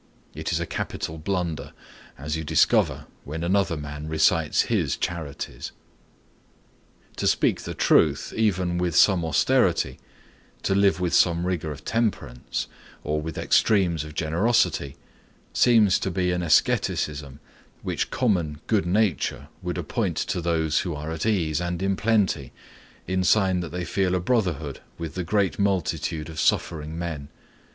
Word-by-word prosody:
It - - -4
is - - +1
a - - -2
capital 80 +1 -4
blunder; 85 -1 -3 0.4
as 75 +3 -3
you 80 - -3
discover 75 0 +2 0.2
when 80 +4 -5
another 90 -2 +1
man 75 +1 -6
recites 80 0 +2
his - - 0
charities. 80 -5 -5 1.5
To - - 0
speak - - +2
the - - -6
truth, - - +3
even 90 -5 +1
with 90 -2 -1
some 95 -3 +5
austerity, 80 -3 +2 0.6
to - - +1
live 100 -1 +3
with 90 -2 -1
some 85 0 +3
rigor 85 -4 -2
of 75 - -9
temperance, 110 - -2 0.4
or 75 0 -1
some - - -5
extremes 90 -7 +3
of 75 0 -10
generosity, 80 - +1 0.6
seems 110 -6 +4
to - - -2
be 90 0 0
an 90 0 -1
asceticism 75 -3 +1 0.4
which - - -2
common 85 - 0
good 105 -5 +1
nature 90 - 0
would - - -3
appoint - - -2
to 90 - -1
those 80 -2 +1
who 85 -4 -3
are 75 +2 -5
at 80 +6 -2
ease 85 -7 +1
and 90 0 -2
in 95 0 +1
plenty, 100 - +1 0.5
in 95 +1 0
sign 95 -2 +3
that 85 -2 -4
they 90 +2 -4
feel 95 0 0
a - - +1
brotherhood 85 - -1 0.2
with 85 -2 -5
the 90 - -3
great 95 -2 0
multitude 90 -5 -1
of 80 -1 -7
suffering 80 -1 0
men. 80 -5 -5
85 Hz, 145 wpm, -25 LUFS, 75-95 Hz, 1.5 s, some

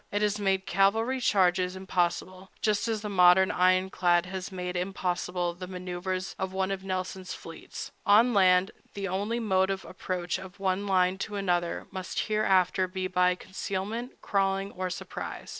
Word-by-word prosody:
It 205 +1 0
has 210 0 +1
made 195 -1 +1
cavalry 225 +7 +2
charges 185 -3 +2
impossible, 185 0 -2
just 215 +1 +1
as 220 -2 -1
the 210 - -4
modern 180 -1 +6
ironclad 185 -1 +3
has 185 0 -5
made 180 -1 -4
impossible 180 -1 -2
the 180 +1 -8
manœuvers 185 +1 -4
of 190 -1 -3
one 190 0 0
of 190 -1 -3
Nelson's 185 0 -4
fleets. 165 -1 -9
On 225 +4 +5
land, 185 -1 +4 0.2
the 200 -1 -3
only 205 +5 -1
mode 190 -4 +2
of 195 -1 -3
approach 180 -1 -3
of 185 -1 -11
one 195 +1 0
line 185 0 +2
to 210 +1 -4
another 175 -3 -1
must 185 -1 -3
hereafter 190 -3 +2
be 185 0 -4
by 180 0 +2
concealment, 200 +6 -5
crawling, 195 0 0
or 185 0 -3
surprise. 180 - -6
190 Hz, 160 wpm, -28 LUFS, 180-195 Hz, 0.2 s, modern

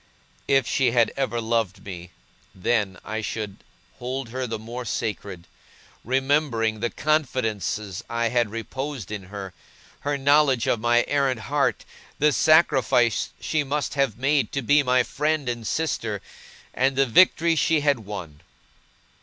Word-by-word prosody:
If 135 -2 +3
she 125 -4 +2
had 115 -3 +3
ever 130 -3 -1
loved 115 -4 -1
me, 90 -3 -8 0.5
then, 95 -1 0
I 110 +1 -3
should 105 -2 -4 0.4
hold 130 0 -4
her 130 +1 -3
the 115 -1 -3
more 120 +3 -7
sacred; 100 -5 -4 0.6
remembering 130 -4 +1
the 120 +2 -1
confidences 110 - -1
I 115 0 0
had 120 -1 +1
reposed 120 0 -5
in 105 -3 -5
her, 95 -1 -8 0.5
her 145 0 -1
knowledge 140 -3 +3
of 115 - +1
my 120 +1 +3
errant 135 -5 +1
heart, 145 +3 0 0.3
the 150 0 +3
sacrifice 130 -6 +3
she 155 -2 0
must 145 +1 -2
have 135 -7 0
made 140 +2 +1
to 140 - -2
be 145 +5 +4
my 125 -2 +3
friend 150 +3 -1
and 120 -2 -3
sister, 115 -10 -2 0.5
and 135 +1 +1
the 135 +1 +3
victory 165 +5 +4
she 160 0 +2
had 145 -3 +2
won. 95 -8 -8
120 Hz, 145 wpm, -24 LUFS, 110-140 Hz, 0.6 s, be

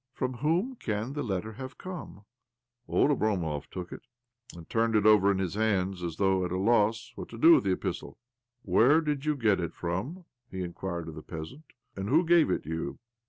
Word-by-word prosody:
" - - -58
From 130 -1 -2
whom 175 - 0
can 110 - -3
the 145 - -3
letter 110 -2 -3
have 130 +2 -8
come? 175 - -8 0.3
" 120 0 -52
Old 150 - +3
Oblomov 90 - -1
took 90 -2 -7
it, - - -8 0.6
and 85 - -11
turned 115 0 +1
it 105 -1 +3
over 105 -2 +6
in 100 - 0
his 95 -3 -2
hands, 95 -4 0
as 85 -2 -4
though 95 0 +2
at 90 - -3
a 90 - -1
loss 110 +2 +2
what - - -8
to 115 - -9
do 165 +8 +8
with 100 - +4
the 95 - +2
epistle. - - -4 0.3
' 120 +1 -56
Where 120 - +5
did 150 -2 -2
you 150 0 +1
get 110 -8 +2
it 85 -2 -4
from?" 110 - -4 0.2
he 95 -1 -4
in 85 -1 -6
quired 85 -3 -4
of - - -8
the 80 - -8
peasant. 80 - -8 0.2
' 125 - -48
And 95 +1 -4
who 160 +7 +4
gave 170 -1 +5
it - - -1
you?" 80 +1 -4
110 Hz, 225 wpm, -29 LUFS, 95-130 Hz, 0.6 s, do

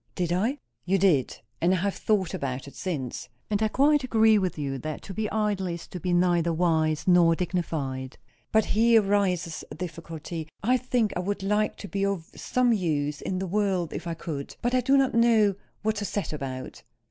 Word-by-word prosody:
"Did 175 -2 0
I?" 225 +10 0 0.3
"You 190 +2 +2
did. 170 -10 +2 0.2
And 180 +3 +3
I - - 0
have 195 +2 0
thought 195 -5 0
about 130 0 -3
it 140 - -11
since. 145 -12 -4 0.2
And 205 0 +1
I 220 - +3
quite 285 +5 +3
agree 220 -3 +4
with 185 -4 -2
you 135 -2 -3
that 155 +3 -5
to 195 - -7
be 215 +1 -2
idle 210 -3 0
is 170 -1 -5
to 180 - -6
be 180 +2 -2
neither 175 -1 +3
wise 160 -2 +1
nor 175 -2 +5
dignified. 155 -7 -3 0.3
But 220 -1 +4
here 225 +1 +4
rises 180 -6 0
a - - -8
difficulty. 165 -1 -6 0.2
I 250 +4 +4
think 245 -4 0
I - - -1
would 195 +2 -2
like 210 +2 +1
to 200 - -8
be 195 0 -2
of 195 -5 -2
some 250 -2 +1
use 150 -7 -1
in 185 - -2
the 190 - -2
world, 190 -3 0
if - - -5
I 165 - -2
could. 145 -4 -6
But 240 +1 +1
I 255 - +3
do 270 +3 +4
not 270 -1 +2
know 225 -3 +4 0.3
what 215 0 0
to 205 - -2
set 205 -5 -3
about." 130 -3 -6
185 Hz, 205 wpm, -26 LUFS, 165-215 Hz, 0.3 s, nor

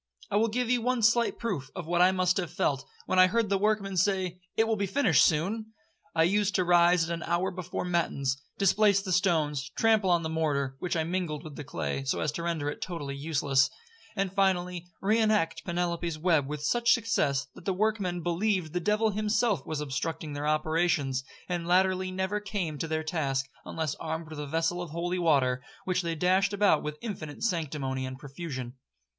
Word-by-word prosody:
I - - 0
will 225 +2 +3
give 245 +2 -1
you 245 -1 +2
one 250 0 0
slight 230 +2 +3
proof 175 - -3
of 180 -3 -5
what 175 +1 +1
I 180 +1 +6
must 185 0 +1
have 175 -4 -2
felt, 140 -5 0 0.2
when 185 - +1
I 185 - +8
heard 225 +1 0
the 200 - +2
workmen 205 -2 0
say, 185 -1 +1 0.2
'It 225 - +3
will 225 - +2
be 200 -1 -1
finished 195 - +4
soon.' 215 +8 0 0.4
I 160 - +4
used 200 +3 +2
to 185 - +3
rise 175 -1 +4
at 170 - -2
an 170 - -4
hour 175 +3 0
before 180 0 -4
matins, 140 -6 0 0.2
displace 200 +1 +4
the 195 -2 -5
stones, 160 -7 +1
trample 220 -4 +3
on 170 -1 +3
the - - -1
mortar, 145 -4 -1
which 175 +3 -2
I 160 - +1
mingled 170 -3 -2
with 155 -3 -9
the 150 - -6
clay, 80 - -3
so 135 - -1
as 150 - 0
to 160 - -5
render 165 -4 -2
it 145 - -4
totally 145 -6 -4
useless; 140 -3 +2 0.5
and 195 -2 -1
finally, 180 -3 0 0.2
re 215 +3 +3
act 210 -7 +1
Penelope's 170 -2 -2
web 155 -4 +2
with 150 0 -5
such 240 +8 +3
success, 205 - +1
that - - -14
the 195 - +1
workmen 190 -3 0
believed 175 -1 0
the 180 - 0
devil 210 +4 +1
himself 215 - 0
was 155 -2 -3
obstructing 150 +2 -3
their 145 +1 -3
operations, 155 -3 +1 0.2
and 175 -2 -3
latterly 185 +1 +2
never 190 +2 -1
came 195 -8 -3
to 165 - -2
their 160 0 -1
task 140 -5 -1 0.2
unless 160 -3 -2
armed 160 0 -4
with 155 - -7
a 150 - -4
vessel 165 +4 0
of 175 - -6
holy 175 +3 -2
water, 135 -7 +2 0.2
which 185 0 +1
they 170 -2 -2
dashed 185 +4 +2
about 200 -6 +3
with 150 0 -5
infinite 165 -10 -6
sanctimony 150 -9 -1
and 130 0 -7
profusion. 135 -3 -6
175 Hz, 200 wpm, -28 LUFS, 155-195 Hz, 0.5 s, I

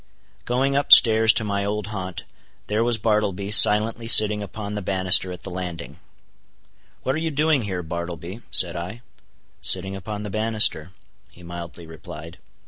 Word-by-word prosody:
Going 135 +3 -2
up 140 - -2
stairs 110 -1 +7
to 110 - -1
my 100 -1 -3
old 105 0 -4
haunt, 95 -3 -7 0.4
there 105 +2 -2
was 120 -1 0
Bartleby 105 -2 -2
silently 110 +2 +4
sitting 105 -2 +5
upon 105 +1 -8
the 105 - -5
banister 95 -1 +2
at 90 -1 -11
the 95 - -9
landing. 90 -2 -8 1.0
"What 130 - -2
are 155 - -4
you 160 0 -3
doing 150 -1 0
here, 95 -4 -6
Bartleby?" 85 +4 -8
said 90 -2 +3
I. 90 +7 -8 0.6
"Sitting 95 +1 +1
upon 105 +2 -8
the 105 - -8
banister," 110 -6 0 0.4
he 90 - -19
mildly 85 0 -10
replied. 80 +1 -12
100 Hz, 155 wpm, -21 LUFS, 90-110 Hz, 1.0 s, stairs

